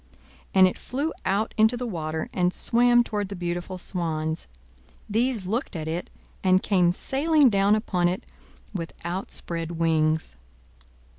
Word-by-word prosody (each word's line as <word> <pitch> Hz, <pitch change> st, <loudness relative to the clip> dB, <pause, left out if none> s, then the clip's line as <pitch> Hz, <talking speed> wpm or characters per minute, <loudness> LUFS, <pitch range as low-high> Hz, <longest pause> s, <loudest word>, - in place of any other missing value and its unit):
And 190 Hz, -1 st, +8 dB
it 185 Hz, -, -4 dB
flew 285 Hz, +5 st, -2 dB
out 200 Hz, +3 st, 0 dB
into 220 Hz, +3 st, +4 dB
the 250 Hz, -, -3 dB
water, 160 Hz, -6 st, -3 dB
and 180 Hz, -1 st, +2 dB
swam 240 Hz, 0 st, +4 dB
toward 205 Hz, -4 st, -3 dB
the 200 Hz, -, -5 dB
beautiful 175 Hz, +1 st, -4 dB
swans: 160 Hz, -3 st, -2 dB, 0.6 s
these 225 Hz, -1 st, 0 dB
looked 220 Hz, +3 st, -2 dB
at 160 Hz, -1 st, -4 dB
it, 165 Hz, +2 st, -3 dB, 0.3 s
and 185 Hz, 0 st, +4 dB
came 180 Hz, -4 st, +3 dB
sailing 280 Hz, -, +3 dB
down 200 Hz, +1 st, +4 dB
upon 185 Hz, -5 st, +1 dB
it 180 Hz, +2 st, -2 dB, 0.5 s
with 170 Hz, -4 st, -5 dB
outspread 170 Hz, -2 st, -3 dB
wings. 160 Hz, -, +1 dB
185 Hz, 140 wpm, -25 LUFS, 170-220 Hz, 0.6 s, And